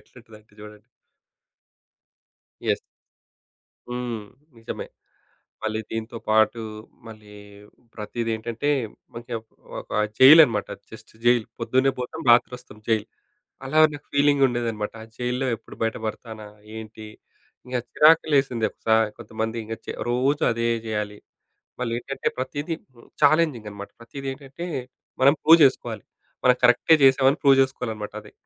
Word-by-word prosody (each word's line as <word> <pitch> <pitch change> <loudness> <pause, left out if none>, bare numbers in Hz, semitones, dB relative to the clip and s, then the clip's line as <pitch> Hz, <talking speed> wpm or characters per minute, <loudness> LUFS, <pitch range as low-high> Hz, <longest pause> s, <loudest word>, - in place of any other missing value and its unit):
ఎట్లుంటదంటే 110 -3 -18
జూడండి. 105 -1 -12 1.8
యెస్. - - +1 1.1
హ్మ్. 120 -3 -4 0.4
నిజమే. 115 - -6 0.8
మళ్ళీ 110 0 -2
దీంతో 115 +1 -5
పాటు, 110 +2 +3 0.5
మళ్ళీ 105 -2 -13 0.6
ప్రతీదేంటంటే, 115 +3 -3 0.5
కొంచెం 115 0 -6
ఒక్ - - -50 0.3
ఒక - - -13 0.3
జైల్ 145 +5 +10
అనమాట. 105 -6 -3 0.2
జస్ట్ - - -13
జైల్ 120 -2 +4
పొద్దున్నే 130 +3 +2
పోతాం, 125 +6 -5
రాత్రోస్తాం 120 -2 +1
జైల్, 110 -1 +1 0.6
అలా 155 +4 0
నాకు 145 0 -10
ఫీలింగ్ 140 -1 +3
ఉండేదన్నమాట. 115 -4 -3
ఆ - - -11
జైల్‌లో 125 +2 -1
ఎప్పుడు - - -15
బయట 115 0 0
బడతానా? 110 -1 -7 0.3
ఏంటి? 110 0 -9 0.6
ఇంగ 125 - -3 0.2
చిరాకులేసింది. 145 -7 +4
ఒకసారి 110 -1 +1
కొంతమంది 110 0 -4
ఇంగ 115 +1 -5 0.4
రోజు 135 +4 +1
అదే 115 0 -1 0.2
జెయాలి. 105 -1 -3 0.6
మళ్ళీ 115 -2 -2
ఏంటంటే, 135 +2 -4
ప్రతీదీ 145 +5 -3 0.5
చాలెంజింగ్ 145 -7 +3
అనమాట 100 0 -9
ప్రతీదేంటంటే, 135 +5 -7 0.6
మనం 140 +2 +6
ప్రూవ్ 165 +2 +7
జేసుకోవాలి. 120 -6 +1 0.4
మనం 125 0 +6
కరెక్టే 125 +6 +4
జేసాం 135 0 +5
అని 140 - 0
ప్రూవ్ 135 -2 +5
జేసుకోవాలన్నమాట 110 -6 -3
అది 105 - -16
120 Hz, 115 wpm, -24 LUFS, 110-135 Hz, 1.8 s, జైల్